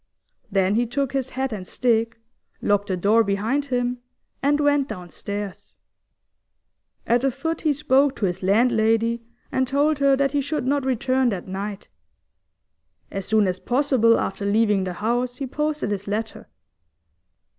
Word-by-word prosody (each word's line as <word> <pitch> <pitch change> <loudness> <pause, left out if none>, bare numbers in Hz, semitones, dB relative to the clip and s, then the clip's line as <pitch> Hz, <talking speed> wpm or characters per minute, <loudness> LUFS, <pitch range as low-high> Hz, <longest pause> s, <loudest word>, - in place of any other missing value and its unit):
Then 195 0 +2
he 235 +2 +1
took 270 +2 -2
his 265 -2 -1
hat 265 -2 -2
and 185 -3 -6
stick, 230 -2 0 0.4
locked 205 0 +1
the 185 -3 -1
door 215 +5 +4
behind 220 +8 0
him, 245 -2 -1 0.4
and 290 +2 +2
went 290 -2 +2
downstairs. 200 - -7 1.3
At 240 +1 +2
the 270 - +2
foot 325 +6 -3
he 310 - +2
spoke 280 -1 +2
to 205 - -1
his 180 -2 -2
landlady, 225 +2 +2 0.3
and 260 0 +1
told 285 +2 +1
her 275 -1 +4
that 275 -1 +1
he 285 0 +1
should 285 -1 -3
not 280 0 +1
return 260 0 +1
that 195 -5 -4
night. 195 +2 -5 1.2
As 195 -1 -5
soon 215 -1 +3
as 185 0 -2
possible 250 -3 +3
after 195 - -3
leaving 205 -1 +2
the 180 - -3
house 240 +5 -1
he 275 - -3
posted 300 -3 -2
his 205 0 -4
letter. 215 +2 -4
235 Hz, 155 wpm, -23 LUFS, 205-270 Hz, 1.3 s, door